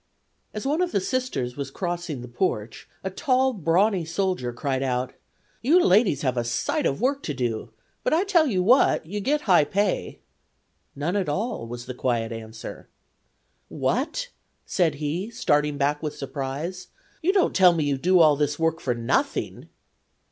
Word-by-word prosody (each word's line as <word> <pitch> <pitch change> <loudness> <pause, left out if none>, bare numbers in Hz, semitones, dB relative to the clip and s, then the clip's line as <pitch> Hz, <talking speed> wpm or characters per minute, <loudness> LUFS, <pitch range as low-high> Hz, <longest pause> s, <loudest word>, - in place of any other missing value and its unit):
As 210 - -6
one 300 +5 +1
of 360 -1 -1
the - - +3
Sisters 195 - -2
was 140 -1 -4
crossing 175 -3 -4
the - - -8
porch 120 - -3
a 190 - -3
tall, 260 +4 +2
brawny 185 +1 +2
soldier 170 -6 -1
cried 130 +2 -2
out: 125 -1 -1 0.5
"You 305 +10 +5
ladies 190 - +3
have 130 -2 0
a 120 - +1
sight 120 +1 0
of 135 - -2
work 275 +4 +1
to 150 - -4
do, 120 -3 -2 0.3
but - - +1
I 330 +4 +3
tell 350 -6 +3
you 190 -8 +1
what, 245 - +4
you 205 +6 -4
get 290 +9 0
high 185 - +5
pay." 200 +4 -1 0.8
"None 155 +7 -2
at 195 -6 0
all," 195 - -2
was 120 +1 -7
the 125 - -6
quiet 120 -2 -1
answer. 110 0 -8 0.8
"What!" 275 - -1 0.4
said 165 -6 +1
he, 155 +8 -3
starting 150 -11 +1
back 145 +1 0
with 150 -1 -4
surprise; 140 +7 -5 0.3
"you 350 - +3
don't 385 -2 +2
tell 180 -2 +7
me 160 -2 0
you 140 -2 0
do 180 +3 +4
all 155 -2 +6
this 145 0 0
work 165 0 0
for 125 -2 -1
nothing?" 115 0 -1
165 Hz, 170 wpm, -25 LUFS, 135-210 Hz, 0.8 s, tell